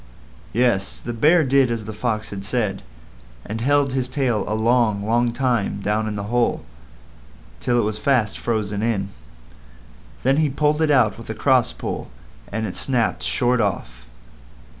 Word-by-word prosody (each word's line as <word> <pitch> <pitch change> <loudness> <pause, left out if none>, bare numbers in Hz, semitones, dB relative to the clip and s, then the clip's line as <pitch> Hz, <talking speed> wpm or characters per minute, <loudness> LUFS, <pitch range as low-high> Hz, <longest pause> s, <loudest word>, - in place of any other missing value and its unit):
Yes; 115 -5 +1
the 120 - -5
Bear 155 +8 +4
did 135 -1 +3
as 115 -2 -3
the 110 - -6
Fox 110 0 -2
had 100 -1 -6
said, 105 -2 -1 0.6
and 110 +2 -5
held 140 +1 +2
his 130 -1 -1
tail 125 -8 0
a 110 - -1
long, 110 -2 +2
long 120 +2 +2
time 120 -5 0
down 105 +2 -1
in 105 - -3
the 100 - -4
hole, 120 -1 +1 0.9
till 120 - +1
it 120 - +3
was 105 0 -2
fast 120 -4 +1
frozen 105 -3 -2
in. 105 -4 -1 1.1
Then 135 +2 +3
he 155 -1 +2
pulled 150 +3 +1
it 160 - +2
out 120 -8 +3
with 115 - -10
a 110 - -3
cross 130 -3 +3
pull, - - -5 0.4
and 110 +2 -2
it 95 - -5
snapped 125 -4 0
short 125 -1 +1
off. - - -3
115 Hz, 165 wpm, -22 LUFS, 105-130 Hz, 1.1 s, Bear